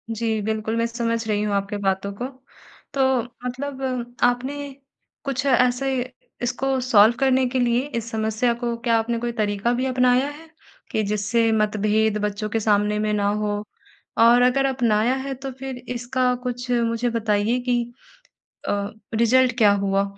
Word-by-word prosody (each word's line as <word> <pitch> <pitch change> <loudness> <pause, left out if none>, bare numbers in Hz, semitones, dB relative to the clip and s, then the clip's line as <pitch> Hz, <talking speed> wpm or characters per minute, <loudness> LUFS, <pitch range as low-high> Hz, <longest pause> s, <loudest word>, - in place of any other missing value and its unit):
जी, 220 -1 -1
बिल्कुल 220 +1 -2
मैं 230 - +1
समझ 230 -1 -2
रही 210 -1 0
हूँ 210 -1 -1
आपके 200 +1 -2
बातों 195 0 -1
को। - - 0 0.7
तो 265 -3 +2 0.2
मतलब 255 -2 -4
आपने 245 +3 +1 0.7
कुछ 275 0 -2
ऐसे 250 0 +2 0.5
इसको 265 +2 0
सॉल्व 230 -2 +5
करने 260 -1 +3
के 260 0 -1
लिए 240 0 +2 0.2
इस 230 0 -4
समस्या 220 +2 0
को 235 -1 -1
क्या 230 -1 +2
आपने 230 +1 -1
कोई 240 0 -2
तरीका 205 +3 0
भी 255 +2 -1
अपनाया 255 +1 +3
है, 315 +2 -12 0.4
कि 215 - 0
जिससे 210 +3 +1
मतभेद 215 0 +1
बच्चों 210 +1 -3
के 225 - 0
सामने 210 0 +2
में 215 0 0
ना 200 -1 +1
हो? 210 0 -1 0.5
और 235 +2 +6
अगर 260 +2 +3
अपनाया 240 -2 +2
है 270 - -2
तो 270 +1 -6
फिर 265 -1 -5 0.2
इसका 250 +1 0
कुछ 250 0 -4
मुझे 235 0 +1
बताइए 225 +1 +1
कि, 245 -1 0 0.9
अ, 200 0 -1 0.2
रिजल्ट 245 +2 +3
क्या 205 -3 +6
हुआ? 195 0 +2
235 Hz, 160 wpm, -23 LUFS, 215-250 Hz, 0.9 s, और